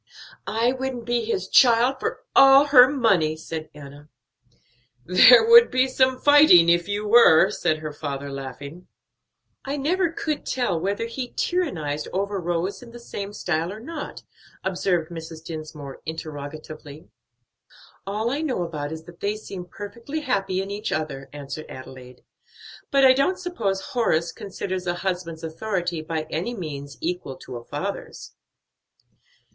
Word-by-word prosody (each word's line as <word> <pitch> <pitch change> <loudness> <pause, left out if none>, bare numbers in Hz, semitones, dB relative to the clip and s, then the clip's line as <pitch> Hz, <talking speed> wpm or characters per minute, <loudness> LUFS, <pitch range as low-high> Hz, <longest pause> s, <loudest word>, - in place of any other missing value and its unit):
"I 225 +5 +1
wouldn't 260 -2 -4
be 240 -1 0
his 190 -4 -2
child 245 +3 +4
for - - -4
all 275 +1 +8
her 255 -3 +8
money," 195 - +2
said 160 0 -7
Enna. 145 0 -13 1.0
"There 245 - +7
would 470 0 +8
be 255 +1 +2
some 260 0 +2
fighting 290 - +7
if 170 +1 +3
you 205 +1 -3
were," 205 -5 +6
said 160 -6 0
her 155 -1 -6
father, 140 -2 -5
laughing. 140 +5 -8 0.8
"I 275 +2 -3
never 345 +5 +1
could 310 -2 -3
tell 240 -10 -1
whether 200 +6 -2
he 245 +2 -5
tyrannized 160 - -2
over 200 +1 -2
Rose 175 +3 -2
in 245 - -12
the 240 +1 -11
same 205 -4 -7
style 170 -4 -2
or 210 - -8
not," 295 +5 -7 0.4
observed 180 -3 -1
Mrs. 160 -1 -8
Dinsmore 155 -4 -8
interrogatively. 155 -1 -8 1.0
"All 215 +4 -1
I 285 +3 -2
know 260 - -1
about 150 -4 -5
it 160 - -5
is 160 - -11
that 170 +1 -15
they 205 +1 -1
seem 195 -4 -8
perfectly 230 - -7
happy 195 -8 -1
in 195 - -7
each 205 +2 -4
other," 135 -3 -4
answered 145 +1 -8
Adelaide; 130 -1 -11 0.7
"but 275 -1 +4
I 260 - +8
don't 275 +8 +1
suppose 220 - -2
Horace 170 -9 +1
considers 185 -2 -5
a 175 - 0
husband's 175 -3 -3
authority 175 0 -3
by 160 -1 -4
any 185 +10 -3
means 145 - -7
equal 175 -5 -3
to 125 -1 -9
a 120 - -10
father's." 190 +11 -6
185 Hz, 150 wpm, -23 LUFS, 155-240 Hz, 1.0 s, all